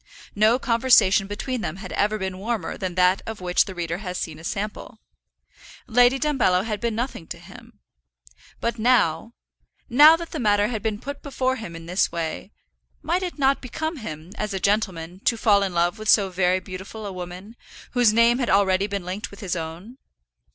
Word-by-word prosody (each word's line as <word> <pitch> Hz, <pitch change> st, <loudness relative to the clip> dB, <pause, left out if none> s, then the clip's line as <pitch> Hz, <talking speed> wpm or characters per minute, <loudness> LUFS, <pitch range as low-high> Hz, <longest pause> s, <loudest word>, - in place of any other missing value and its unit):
No 215 Hz, +4 st, +4 dB
conversation 230 Hz, -6 st, +4 dB
between 230 Hz, +4 st, -4 dB
them 160 Hz, -6 st, -4 dB
had 190 Hz, -1 st, -9 dB
ever 210 Hz, +1 st, 0 dB
been 190 Hz, -2 st, -4 dB
warmer 225 Hz, +2 st, -3 dB
than 185 Hz, -3 st, -4 dB
that 185 Hz, +1 st, +3 dB
of 220 Hz, -1 st, -5 dB
which 180 Hz, -1 st, +2 dB
the 190 Hz, -, -8 dB
reader 170 Hz, 0 st, -3 dB
has 180 Hz, -3 st, -5 dB
seen 155 Hz, -2 st, -5 dB
a -, -, -13 dB
sample. 210 Hz, +4 st, -5 dB, 0.9 s
Lady 245 Hz, +2 st, +4 dB
Dumbello 260 Hz, -11 st, +2 dB
had 215 Hz, -2 st, -3 dB
been 235 Hz, -2 st, -1 dB
nothing 235 Hz, -8 st, -4 dB
to -, -, -7 dB
him. -, -, -15 dB, 0.8 s
But 235 Hz, 0 st, -2 dB
now, 225 Hz, -3 st, +2 dB, 0.6 s
now 300 Hz, +6 st, +8 dB
that 335 Hz, 0 st, -7 dB
the 315 Hz, -, -4 dB
matter 205 Hz, -2 st, +2 dB
had 220 Hz, -4 st, -3 dB
been 215 Hz, -1 st, -2 dB
put 285 Hz, +4 st, -7 dB
before 260 Hz, -2 st, -1 dB
him 180 Hz, -8 st, -8 dB
in 165 Hz, 0 st, -9 dB
this 180 Hz, +3 st, 0 dB
way, 165 Hz, +3 st, -4 dB, 0.5 s
might 340 Hz, +4 st, 0 dB
it 360 Hz, -3 st, -4 dB
not 275 Hz, -1 st, +2 dB
become 315 Hz, +6 st, -4 dB
him, 160 Hz, -, -8 dB
as 210 Hz, -2 st, -2 dB
a -, -, -2 dB
gentleman, 185 Hz, -4 st, -1 dB
to 230 Hz, -, +2 dB
fall 205 Hz, -2 st, +4 dB
in 195 Hz, -1 st, -1 dB
love 175 Hz, +5 st, +1 dB
with 215 Hz, 0 st, -3 dB
so 195 Hz, -3 st, +4 dB
very 180 Hz, 0 st, +2 dB
beautiful 190 Hz, +3 st, -8 dB
a 200 Hz, -, -5 dB
woman, 180 Hz, +4 st, -8 dB, 0.4 s
whose 245 Hz, -3 st, +4 dB
name 230 Hz, +2 st, +4 dB
had 245 Hz, -, -1 dB
already 195 Hz, 0 st, +3 dB
been 200 Hz, -3 st, -4 dB
linked 185 Hz, +3 st, -5 dB
with 200 Hz, -, -13 dB
his 185 Hz, -3 st, -2 dB
own? 170 Hz, +10 st, -7 dB
205 Hz, 195 wpm, -23 LUFS, 185-235 Hz, 0.9 s, now